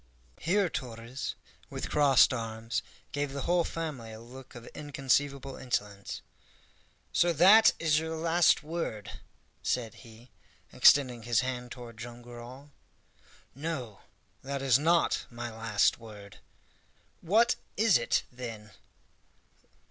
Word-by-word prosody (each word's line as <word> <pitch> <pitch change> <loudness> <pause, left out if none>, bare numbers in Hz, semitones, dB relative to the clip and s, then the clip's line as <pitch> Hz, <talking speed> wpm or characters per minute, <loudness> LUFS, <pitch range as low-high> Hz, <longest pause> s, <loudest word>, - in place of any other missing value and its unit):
Here 190 +4 +2
Torres, 120 -3 -5 0.3
with - - -5
crossed 140 -4 +5
arms, 115 0 -3 0.3
gave 145 -1 -2
the 140 -1 -4
whole 175 0 +2
family 150 -10 -5
a 110 - -9
look 130 +3 -13
of 120 -1 -10
inconceivable 140 -1 -1
insolence. 105 -5 -4 0.9
"So 175 - +3
that 195 +8 +7
is 155 -2 +2
you 160 0 -4
last 165 0 +3
word?" 155 -10 -5 0.4
said 115 -3 -1
he, 115 +1 -16 0.4
extending 130 -4 +5
his 115 +1 +2
hand 125 -2 -4
toward 120 -3 -10
Joam 120 +1 -9
Garral. 120 +4 -11 0.8
"No, 135 -8 -5 0.4
that 140 0 -4
is 130 -1 +4
not 165 +3 +2
my 120 0 -6
last 110 -1 +1
word." 105 -3 -12 0.8
"What 225 +8 +3 0.2
is 215 - +5
it, 120 - +1
then?" 115 -4 -8
130 Hz, 120 wpm, -30 LUFS, 115-150 Hz, 0.9 s, that